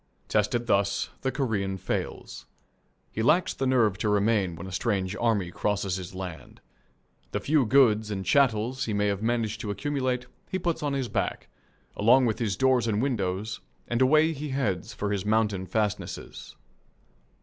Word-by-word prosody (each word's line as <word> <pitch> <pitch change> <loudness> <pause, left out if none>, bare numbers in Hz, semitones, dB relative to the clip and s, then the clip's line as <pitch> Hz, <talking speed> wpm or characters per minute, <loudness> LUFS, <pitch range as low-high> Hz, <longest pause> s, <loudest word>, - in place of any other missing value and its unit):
Tested 115 +3 +1
thus, 100 -2 +1
the 130 - 0
Korean 105 -8 -1
fails. - - -4 0.6
He 110 - -3
lacks 170 +10 +3
the 135 - -2
nerve 115 -7 +2
to 110 - 0
remain 105 -3 +2
when 85 +3 -8
a 95 - -7
strange 95 -1 -1
army 105 -7 +1
crosses 100 -2 -1
his 95 0 -8
land. 90 -3 -8 0.7
The - - 0
few 145 -5 +2
goods 110 -4 +4
and 95 -2 -3
chattels 130 +2 +2
he 110 - -2
may 105 0 +1
have 100 -1 0
managed 115 -2 -1
to 105 - -4
accumulate 130 +2 -1 0.2
he 190 - -1
puts 175 -2 -1
on 145 -2 -1
his 135 -2 -1
back, - - -2 0.5
along 125 +5 +5
with 110 -2 0
his 105 -5 -1
doors 130 -2 +3
and 105 -2 +1
windows, 110 -4 -1 0.3
and 120 +1 -1
away 155 +5 +5
he 150 0 -5
heads 110 -10 -1
for 105 0 -3
his 100 -2 -1
mountain 105 -3 +1
fastnesses. 105 +1 -3
110 Hz, 165 wpm, -27 LUFS, 100-130 Hz, 0.7 s, along